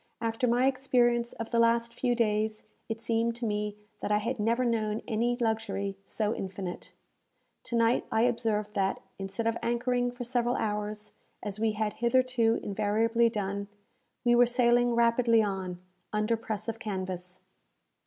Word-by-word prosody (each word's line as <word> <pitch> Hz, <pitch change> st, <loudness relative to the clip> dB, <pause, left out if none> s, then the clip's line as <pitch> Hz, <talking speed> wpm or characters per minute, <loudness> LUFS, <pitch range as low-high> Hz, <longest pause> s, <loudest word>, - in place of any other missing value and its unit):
After 230 Hz, +2 st, 0 dB
my 245 Hz, +2 st, +3 dB
experience 245 Hz, -3 st, +2 dB
of 230 Hz, -, -6 dB
the 235 Hz, -, +2 dB
last 230 Hz, 0 st, +3 dB
few 245 Hz, 0 st, 0 dB
days, 215 Hz, -1 st, 0 dB, 0.3 s
it 225 Hz, 0 st, -3 dB
seemed 230 Hz, 0 st, 0 dB
to 240 Hz, 0 st, -4 dB
me 210 Hz, -1 st, -2 dB, 0.2 s
that -, -, -2 dB
I 210 Hz, -, +4 dB
had 230 Hz, +3 st, -2 dB
never 230 Hz, +4 st, +2 dB
known 220 Hz, -2 st, 0 dB
any 240 Hz, +1 st, +1 dB
luxury 210 Hz, -4 st, -1 dB
so 215 Hz, +2 st, -1 dB
infinite. 190 Hz, -3 st, -6 dB, 0.7 s
To 235 Hz, -, -3 dB
night 230 Hz, +1 st, +3 dB
I 220 Hz, -, +3 dB
observed 220 Hz, -4 st, 0 dB
that, 195 Hz, -1 st, 0 dB, 0.2 s
instead 195 Hz, +3 st, -3 dB
of 230 Hz, 0 st, 0 dB
anchoring 245 Hz, +1 st, +1 dB
for 245 Hz, 0 st, -6 dB
several 245 Hz, 0 st, 0 dB
hours, 210 Hz, 0 st, -3 dB, 0.3 s
as 205 Hz, 0 st, -5 dB
we 220 Hz, -1 st, +1 dB
had 210 Hz, 0 st, -1 dB
hitherto 240 Hz, -2 st, +3 dB
invariably 220 Hz, +3 st, +2 dB
done, 200 Hz, -2 st, -3 dB, 0.6 s
we 240 Hz, -, +5 dB
were 240 Hz, 0 st, +6 dB
sailing 240 Hz, -1 st, +3 dB
rapidly 235 Hz, -1 st, +4 dB
on, 190 Hz, -3 st, -3 dB, 0.3 s
under 215 Hz, +2 st, +1 dB
press 215 Hz, -1 st, -5 dB
of 225 Hz, 0 st, -3 dB
canvass. 185 Hz, -3 st, -5 dB
225 Hz, 155 wpm, -29 LUFS, 210-240 Hz, 0.7 s, were